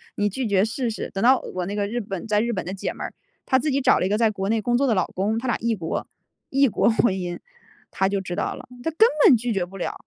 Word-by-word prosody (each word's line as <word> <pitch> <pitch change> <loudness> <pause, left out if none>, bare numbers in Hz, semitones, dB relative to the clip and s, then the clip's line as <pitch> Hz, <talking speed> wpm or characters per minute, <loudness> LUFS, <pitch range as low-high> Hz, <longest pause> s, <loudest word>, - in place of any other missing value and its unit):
“你 205 - +1
拒 245 +4 -3
绝 195 -1 +3
试 230 +2 -2
试。” 220 - -5
等 195 - -2
到 260 +2 +6
我 180 -1 -3
那 200 - -4
个 205 -1 0
日 240 +3 -2
本 195 -1 -6
在 210 -1 +2
日 235 +1 -1
本 185 - -3
的 185 - -4
姐 195 - -3
妹 - - -8
儿， - - -6 0.3
她 260 -1 +3
自 300 - -1
己 275 0 +1
找 255 - +4
了 - - 0
一 - - -3
个 210 - +1
在 225 -1 +3
国 195 -1 -3
内 225 0 +2
工 240 +2 +1
作 275 - +2
的 230 - +2
老 185 - +2
公， 205 +4 0
她 235 - -4
俩 240 - +1
异 230 0 0
国 165 -5 -4 0.4
异 275 +1 +4
国 215 - +2
婚 225 -2 +2
姻， 180 -2 -4 0.5
她 190 0 +1
就 200 - 0
知 180 -2 -5
道 - - -2
了， - - -11 0.2
他 - - 0
根 380 +8 +5 0.2
本 250 - +8
拒 235 +1 -2
绝 195 -3 0
不 185 +2 -9
了。 - - -3
215 Hz, 320 characters per minute, -23 LUFS, 195-240 Hz, 0.5 s, 本